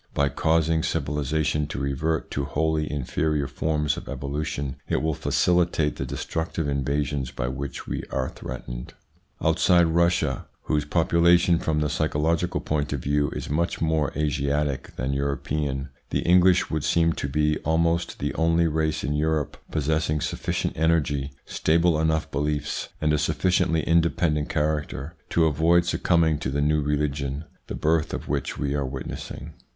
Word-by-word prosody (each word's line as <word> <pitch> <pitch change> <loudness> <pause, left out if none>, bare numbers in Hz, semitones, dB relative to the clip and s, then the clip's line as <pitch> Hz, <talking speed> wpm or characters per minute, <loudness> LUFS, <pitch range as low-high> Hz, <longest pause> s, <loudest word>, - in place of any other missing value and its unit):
By 70 0 +3
causing 80 +2 +2
civilisation 75 0 0
to - - -5
revert 70 +4 -1
to 70 - -1
wholly 75 +2 0
inferior 75 +1 -1
forms 75 +1 -1
of - - -8
evolution, 70 0 -3
it - - +2
will 80 0 +1
facilitate 85 -1 +1
the - - -3
destructive 80 -1 -3
invasions 70 -1 -1
by 60 - -3
which 65 +1 -5
we - - -3
are 65 -1 -1
threatened. - - -7 0.5
Outside 85 -1 +4
Russia, 85 -4 +1 0.2
whose 75 -1 0
population 85 +2 +4
from 75 -1 0
the 75 - +1
psycho 80 +1 -1
logical 85 +3 +1
point 75 -2 -1
of 70 - -2
view 75 +2 +1
is - - -4
much 85 +4 -1
more 80 -3 +1
Asiatic 70 -2 -1
than 65 +2 -2
European, 70 0 -2 0.2
the - - 0
English 90 +1 +4
would 80 -2 -1
seem 85 -1 +3
to 70 - -3
be 75 +2 +1
almost 85 +2 +1
the 70 - -2
only 85 +1 +2
race 80 -1 0
in 70 - -1
Europe 75 0 0
possessing 75 0 0
sufficient - - -2
energy, 75 -3 +1
stable 85 0 +2
enough 80 0 0
beliefs, 75 +1 -2
and 75 0 +2
a 75 - +2
sufficiently 80 +2 +1
independent 85 -2 +2
character 75 -1 -1 0.2
to 85 - +3
avoid 80 +3 +3
succumbing 85 -3 +2
to - - -2
the 70 +2 -1
new 75 +1 +2
religion 70 -1 -1 0.2
the - - -4
birth 80 +1 +1
of - - -6
which 70 -1 -2
we 70 0 -1
are 70 -1 0
witnessing. 65 -1 -6
75 Hz, 155 wpm, -25 LUFS, 70-80 Hz, 0.5 s, Outside